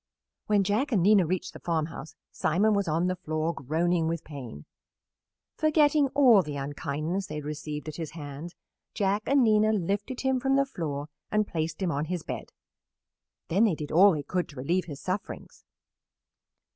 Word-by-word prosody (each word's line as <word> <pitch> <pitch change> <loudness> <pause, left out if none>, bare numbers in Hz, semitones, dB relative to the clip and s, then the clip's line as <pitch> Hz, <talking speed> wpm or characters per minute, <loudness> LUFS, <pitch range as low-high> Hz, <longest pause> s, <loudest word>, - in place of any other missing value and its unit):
When 205 -2 +3
Jack 215 +9 0
and 200 -7 +2
Nina 200 -3 +5
reached 185 +1 -2
the - - -10
farmhouse 160 -1 -3 0.2
Simon 200 +7 +2
was 200 -2 0
on 165 +3 +1
the 185 0 0
floor, 155 0 -2
groaning 165 +4 0
with 165 -1 -2
pain. 125 - -9 0.9
Forgetting 300 -2 +3
all 250 -8 +7
the 150 -4 -6
unkindness 150 +6 -3
they 150 - -6
had 150 -1 -5
received 150 0 -5
at 155 - -6
his 165 -2 -5
hands, 145 +3 -7 0.4
Jack 200 +1 +1
and 275 -1 +4
Nina 215 -1 +4
lifted 205 +5 -2
him 265 -1 +1
from 270 +1 +1
the 275 0 +3
floor 150 - -4 0.2
and 215 0 +2
placed 160 +2 -3
him 175 - +1
on 145 +1 -1
his 175 0 -3
bed. - - -6 1.0
Then 195 +7 +3
they 195 -7 +2
did 150 -1 -6
all 190 +4 +7
they 150 -2 -3
could 180 +4 -2
to 145 - -13
relieve 170 +8 0
his 145 -5 -8
sufferings. 190 +2 -5
175 Hz, 175 wpm, -28 LUFS, 155-210 Hz, 1.0 s, all